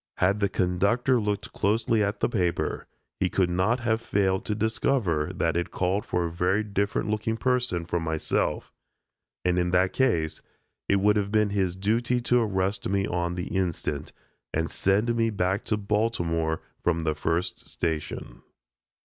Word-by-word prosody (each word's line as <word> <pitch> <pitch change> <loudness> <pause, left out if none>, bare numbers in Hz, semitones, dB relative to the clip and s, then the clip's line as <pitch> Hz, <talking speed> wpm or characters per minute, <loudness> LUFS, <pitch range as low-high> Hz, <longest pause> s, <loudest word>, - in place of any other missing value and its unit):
Had 100 +3 +2
the 100 -1 +2
conductor 100 +9 +2
looked 105 -1 -2
closely 110 +1 +2
at 100 +1 -2
the - - +3
paper, 90 -7 -1 0.3
he 95 - +2
could 90 -2 +1
not 100 +8 +1
have 110 -1 +1
failed 95 -3 +1
to 105 - -1
discover 110 - 0
that 85 -1 0
it 85 0 -1
called 95 +3 -1
for 90 -1 0
a 85 - -3
very 90 +5 +1
different 100 0 -1
looking 110 +1 -1
person 125 -9 0
from 85 0 -1
myself, 80 -1 -1 0.7
and 90 0 +2
in 90 0 +1
that 90 +1 +2
case 85 -12 +1 0.5
it 100 - +4
would 105 +2 +3
have 100 -1 -1
been 105 -1 +2
his 95 -3 0
duty 115 +6 +1
to 120 0 +2
arrest 95 -3 -1
me 100 0 +1
on 85 -1 -1
the 90 +2 -4
instant, 90 -4 -2 0.4
and 80 +1 -1
send 105 +5 +1
me 115 -1 +2
back 95 -1 0
to 110 - 0
Baltimore 85 -7 0 0.2
from 85 -2 +1
the 80 -1 +1
first 80 +3 -2
station. 80 -2 -4
95 Hz, 165 wpm, -26 LUFS, 90-110 Hz, 0.7 s, it